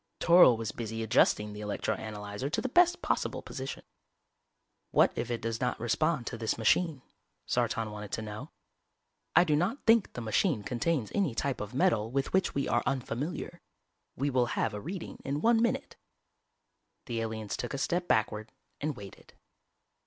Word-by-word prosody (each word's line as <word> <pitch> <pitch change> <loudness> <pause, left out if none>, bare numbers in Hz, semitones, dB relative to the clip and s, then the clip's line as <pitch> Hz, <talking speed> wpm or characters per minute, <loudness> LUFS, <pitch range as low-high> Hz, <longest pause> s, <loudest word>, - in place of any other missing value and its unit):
Toryl 170 -9 +7
was 110 -2 -3
busy 115 0 -4
adjusting 105 -1 +3
the 105 - -7
electro 105 -1 -1
analyzer 105 +3 -5
to 155 - -1
the - - -1
best 350 +6 +4
possible - - -1
position. 135 -1 -6 1.1
"What - - +4
if 120 - -3
it 120 -1 -3
does 115 +1 -2
not 125 -1 0
respond 140 +4 +1
to 115 - -5
this 110 -1 -1
machine?" 140 +5 +2 0.4
Sartan 115 -2 0
wanted 105 -1 -7
to 110 - -2
know. 105 0 -7 0.9
"_I 175 +2 +7
do 150 -3 +2
not 190 - -1
think 225 -2 +4
the - - -5
machine 115 - +1
contains 125 +1 -1
any 185 - +1
type 135 +1 -1
of 105 +3 -6
metal 115 -4 +2
with 135 +2 -2
which 190 0 +2
we 140 - 0
are 120 - +2
unfamiliar. 135 +7 -3 0.5
We 140 +2 -1
will 125 -2 +2
have 110 - +1
a 105 - -5
reading 180 - -6
in 140 +2 -2
one 225 +5 +4
minute._" 255 +4 0 1.1
The 115 -4 -2
aliens 110 -2 -3
took - - -4
a - - -2
step 175 +5 -1
backward 110 0 0 0.3
and 150 -1 -2
waited. 100 -2 -12
125 Hz, 170 wpm, -30 LUFS, 110-160 Hz, 1.1 s, Toryl